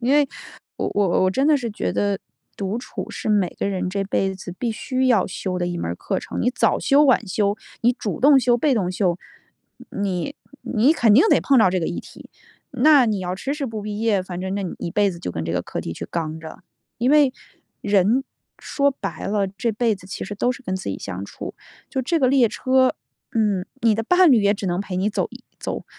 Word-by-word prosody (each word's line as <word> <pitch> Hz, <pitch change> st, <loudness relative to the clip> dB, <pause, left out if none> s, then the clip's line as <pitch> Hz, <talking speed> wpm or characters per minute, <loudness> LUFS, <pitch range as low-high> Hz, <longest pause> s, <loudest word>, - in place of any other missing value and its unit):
因 250 Hz, +3 st, +1 dB
为 290 Hz, -2 st, +4 dB, 0.5 s
我 -, -, -2 dB
我 195 Hz, -2 st, +2 dB
我 185 Hz, -, +3 dB
真 270 Hz, +8 st, +1 dB
的 305 Hz, -1 st, +5 dB
是 240 Hz, -4 st, -3 dB
觉 210 Hz, -, -2 dB
得， 200 Hz, -1 st, 0 dB, 0.4 s
独 200 Hz, +3 st, -2 dB
处 245 Hz, -, -7 dB
是 -, -, -5 dB
每 205 Hz, -4 st, +3 dB
个 -, -, 0 dB
人 190 Hz, -2 st, -2 dB
这 200 Hz, 0 st, -1 dB
辈 195 Hz, 0 st, 0 dB
子 185 Hz, -1 st, -8 dB
必 240 Hz, -, -1 dB
须 255 Hz, +4 st, -1 dB
要 225 Hz, -7 st, +3 dB
修 180 Hz, 0 st, -4 dB
的 175 Hz, -, -1 dB
一 175 Hz, 0 st, -3 dB
门 -, -, -3 dB
儿 -, -, -3 dB
课 -, -, -2 dB
程。 -, -, -5 dB
你 245 Hz, -, +2 dB
早 -, -, +2 dB
修 280 Hz, +1 st, +4 dB
晚 255 Hz, -5 st, +3 dB
修， 200 Hz, +2 st, 0 dB, 0.2 s
你 240 Hz, +2 st, +4 dB
主 230 Hz, -4 st, -4 dB
动 280 Hz, +1 st, +7 dB
修 245 Hz, -1 st, +3 dB
被 275 Hz, +3 st, +2 dB
动 190 Hz, -6 st, 0 dB
修。 180 Hz, -2 st, 0 dB, 0.7 s
你 200 Hz, +6 st, -2 dB, 0.3 s
你 250 Hz, +6 st, +3 dB
肯 235 Hz, -9 st, +3 dB
定 250 Hz, +9 st, +7 dB
得 -, -, +5 dB
碰 275 Hz, -2 st, +3 dB
到 220 Hz, -, +6 dB
这 185 Hz, 0 st, 0 dB
个 160 Hz, -, -1 dB
议 -, -, -3 dB
题， -, -, -14 dB, 0.4 s
那 275 Hz, +1 st, +5 dB
你 215 Hz, -3 st, 0 dB
要 180 Hz, -1 st, -3 dB
迟 270 Hz, +9 st, -3 dB
迟 290 Hz, -2 st, -3 dB
不 220 Hz, -3 st, -5 dB
毕 210 Hz, 0 st, -5 dB
业， 215 Hz, -4 st, +2 dB
反 180 Hz, -1 st, -6 dB
正 190 Hz, +1 st, -3 dB
那 200 Hz, -, -2 dB
你 185 Hz, -, -4 dB
一 170 Hz, -, -4 dB
辈 200 Hz, +2 st, +2 dB
子 170 Hz, -, -8 dB
就 130 Hz, -, -4 dB
跟 80 Hz, -1 st, -4 dB
这 80 Hz, -, -3 dB
个 90 Hz, -, 0 dB
课 -, -, -5 dB
题 -, -, -5 dB
去 -, -, -7 dB
刚 160 Hz, -1 st, -3 dB
着。 160 Hz, -, -10 dB, 0.4 s
因 245 Hz, +3 st, +1 dB
为 295 Hz, -2 st, +5 dB, 0.5 s
人， 205 Hz, +6 st, +3 dB, 0.3 s
说 280 Hz, 0 st, +1 dB
白 275 Hz, -, -6 dB
了， 200 Hz, 0 st, +1 dB
这 200 Hz, +5 st, -2 dB
辈 225 Hz, +1 st, +1 dB
子 185 Hz, -2 st, -14 dB
其 195 Hz, -, -5 dB
实 205 Hz, -, -6 dB
都 245 Hz, +5 st, +1 dB
是 255 Hz, +1 st, -6 dB
跟 185 Hz, -6 st, -3 dB
自 190 Hz, -, -5 dB
己 95 Hz, -, -3 dB
相 95 Hz, -1 st, -6 dB
处。 -, -, -8 dB, 0.4 s
就 265 Hz, -, -1 dB
这 325 Hz, +7 st, 0 dB
个 265 Hz, -, +3 dB
列 255 Hz, -2 st, +4 dB
车， 260 Hz, +3 st, +2 dB, 0.4 s
嗯， 205 Hz, -5 st, +1 dB, 0.2 s
你 225 Hz, -2 st, +4 dB
的 225 Hz, -, -1 dB
伴 360 Hz, +5 st, +5 dB
侣 235 Hz, -, +5 dB
也 200 Hz, +1 st, +3 dB
只 200 Hz, -, -7 dB
能 175 Hz, 0 st, 0 dB
陪 195 Hz, -2 st, -5 dB
你 195 Hz, +3 st, +1 dB
走 -, -, -1 dB, 0.3 s
走 -, -, -4 dB
210 Hz, 255 characters per minute, -22 LUFS, 185-255 Hz, 0.7 s, 动